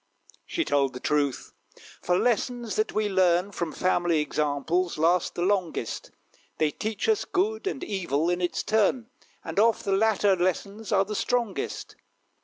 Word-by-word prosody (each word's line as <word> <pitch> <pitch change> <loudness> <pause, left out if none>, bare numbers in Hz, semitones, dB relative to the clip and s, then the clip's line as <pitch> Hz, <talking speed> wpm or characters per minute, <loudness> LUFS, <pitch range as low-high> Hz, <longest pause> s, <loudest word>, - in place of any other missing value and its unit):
She 335 - -1
told 140 -2 +1
the 125 - -7
truth 145 -1 -1 0.5
for 180 - +1
lessons 240 0 0
that 215 0 0
we 215 0 0
learn 185 -1 +2
From 170 -4 -3
family 175 -2 +1
examples 150 +4 -1
last 165 +3 +2
the 175 - -1
longest. 185 - -1 0.5
They 155 -1 +2
teach 220 - -3
us 440 -2 +2
good 415 +2 -1
and 335 - -3
evil, 170 -6 -1
in 175 +1 0
its 175 - -1
turn; 225 +3 +1 0.3
And - - -2
oft 225 +1 +3
the 200 - 0
latter 205 -1 +3
lessons 200 +5 -2
are 195 -2 +3
the 210 - -5
strongest. 235 -2 -2
190 Hz, 155 wpm, -26 LUFS, 170-220 Hz, 0.5 s, oft